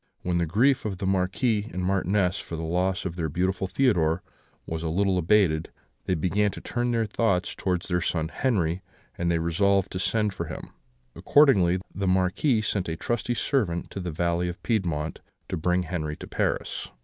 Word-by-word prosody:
When 90 -1 0
the 85 - 0
grief 125 - +3
of 100 -4 -3
the 95 - -4
Marquis 100 +4 +1
and 90 - -3
Marchioness 95 0 +1
for 85 - -6
the 80 - -4
loss 90 +4 0
of 85 -3 -3
their 80 -2 -1
beautiful 95 +4 0
Theodore 90 -7 +2 0.4
was 80 0 -4
a 80 - -2
little 95 +2 +2
abated, 85 -3 +3 0.4
they 90 - +1
began 100 +5 +1
to - - -7
turn 120 0 -2
their 115 -2 +1
thoughts 100 -3 0
towards 90 -2 -2
their 90 -1 0
son 80 -2 -1
Henri, 95 -7 0 0.3
and 85 0 -1
they 85 - +2
resolved 95 +4 +2
to 90 - -3
send 105 +1 +1
for - - -4
him. - - -8 0.4
Accordingly, 100 - +4 0.2
the 95 0 -2
Marquis 95 +7 +2
sent 100 -5 -1
a 80 - -3
trusty 120 +3 -1
servant 105 -12 0
to - - -5
the 90 -1 -3
valley 85 +2 0
of 90 - -8
Piedmont, 85 -9 -1 0.3
to - - -1
bring 90 +3 +1
Henri 80 -3 -3
to - - -9
Paris. - - -2
90 Hz, 185 wpm, -26 LUFS, 85-105 Hz, 0.4 s, Accordingly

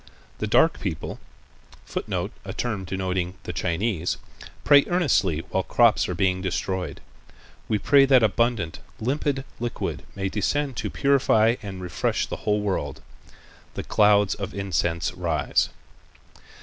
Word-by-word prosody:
The - - -1
dark - - +4
people - - -4 0.7
[Footnote: - - -3
A - - -6
term 110 -6 -3
denoting 90 -1 -2
the 90 - -5
Chinese.] 90 +2 -1 0.5
pray 140 -1 +7
earnestly 120 - +2
while 95 - +1
crops 115 +2 +3
are 90 - -2
being 95 0 +1
destroyed. 95 0 -3 0.7
We 110 - +2
pray 140 +5 +5
that 130 -3 +5
abundant, 115 -6 +1 0.2
limpid 135 +2 -1
liquid 120 0 -3
may 95 -1 -2
descend 135 +8 -1
to - - -2
purify 125 -5 +3
and 95 -3 -7
refresh 90 - -1
the - - -5
whole 105 0 +2
world. 95 -9 -3 0.7
The - - -4
clouds 105 -1 +4
of 100 -1 -6
incense 85 -4 -1
rise." 80 -7 0
100 Hz, 130 wpm, -25 LUFS, 90-120 Hz, 0.7 s, pray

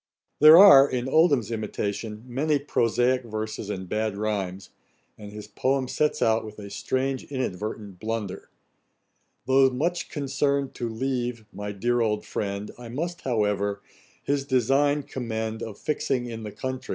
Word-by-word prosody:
There 155 +2 +10
are, 145 -8 +9
in 125 0 -2
Oldham's 140 - +3
imitation, 105 0 -4
many 145 +5 0
prosaick 125 -2 +1
verses 110 -2 -5
and 95 -2 -4
bad 105 +1 -2
rhymes, 100 -3 -3 0.4
and 105 -1 -10
his 105 0 -8
poem 130 +5 0
sets 150 +3 0
out 110 0 +2
with 110 -1 -10
a 100 -1 -9
strange 130 +6 -2
inadvertent 105 -6 -5
blunder: 110 -3 -4 1.0
'Tho' 135 +1 +5
much 165 +8 -2
concern'd 140 -1 -1
to 120 -2 -4
leave 120 -1 -3
my 105 0 -5
dear 120 +4 0
old 105 -2 0
friend, 100 0 -4
I 120 -1 -9
must, 170 +8 -4
however, 105 -4 -1 0.4
his 140 -1 0
design 140 +3 +2
commend 110 -3 -4
Of 110 -3 -6
fixing 140 -5 -1
in 115 -2 -6
the 105 -1 -6
country 130 +3 -5
120 Hz, 145 wpm, -25 LUFS, 105-135 Hz, 1.0 s, There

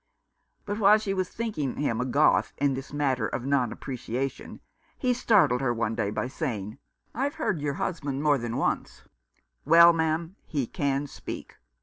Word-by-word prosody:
But 205 +1 -3
while 210 0 +6
she 210 -2 -2
was 185 -1 -1
thinking 210 - -3
him 125 -5 -1
a - - -1
Goth 100 -5 +3
in 140 -1 +2
this 135 +1 -6
matter 135 -6 0
of 120 - -4
non 135 -4 +1
appreciation, 130 0 -5 0.4
he 250 -2 +1
startled 205 - +3
her 130 -3 +1
one 115 -1 -1
day 100 - -1
by 110 - -2
saying, 120 - -4 0.2
" - - -54
I've 280 +4 -2
heard 205 - -1
your 145 -1 -1
husband 145 -6 -3
more 145 -2 +3
than 120 0 -3
once. - - -2 0.6
Well, 170 +3 +7
ma'am, 165 +3 -1
he 140 -5 -1
can 140 +3 -1
speak. 140 - -8
140 Hz, 175 wpm, -27 LUFS, 125-170 Hz, 0.6 s, Well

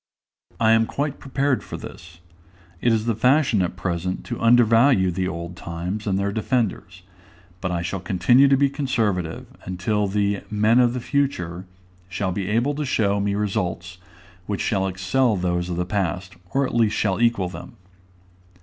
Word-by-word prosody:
I 110 -1 +4
am 115 0 +4
quite 145 0 -3
prepared 135 0 -1
for - - -7
this: 85 0 -11 0.6
it 120 - +3
is 110 -1 +1
the 115 - +1
fashion 125 -1 +3
at 90 - -2
present 90 0 -3
to 120 - -5
undervalue 115 -3 +5
the 90 +1 -2
old 85 -1 -5
times 90 +6 -5
and 95 -1 +1
their 100 +1 -1
defenders; 105 -4 -2 0.6
but 90 - -2
I 85 -1 -2
shall 95 +2 -3
continue 100 +10 +4
to 135 0 +4
be 140 +1 +4
conservative, 110 - -1 0.2
until 100 +3 -1
the 100 0 0
"men 110 +3 +3
of 120 -1 +4
the 125 - -3
future" 95 - -2 0.4
shall 95 +1 -2
be 95 +1 -3
able 120 +7 +1
to 150 +1 -3
show 100 -7 +1
me 100 0 0
results 95 -3 -3 0.5
which 100 -2 -2
shall 95 -2 0
excel 100 +6 +1
those 90 -1 -1
of 90 - -2
the 90 - -1
past, 95 0 -2 0.2
or 140 0 +1
at - - -5
least 115 -3 +2
shall 100 +1 0
equal 115 -6 +2
them. 95 - -10
100 Hz, 170 wpm, -23 LUFS, 90-120 Hz, 0.6 s, undervalue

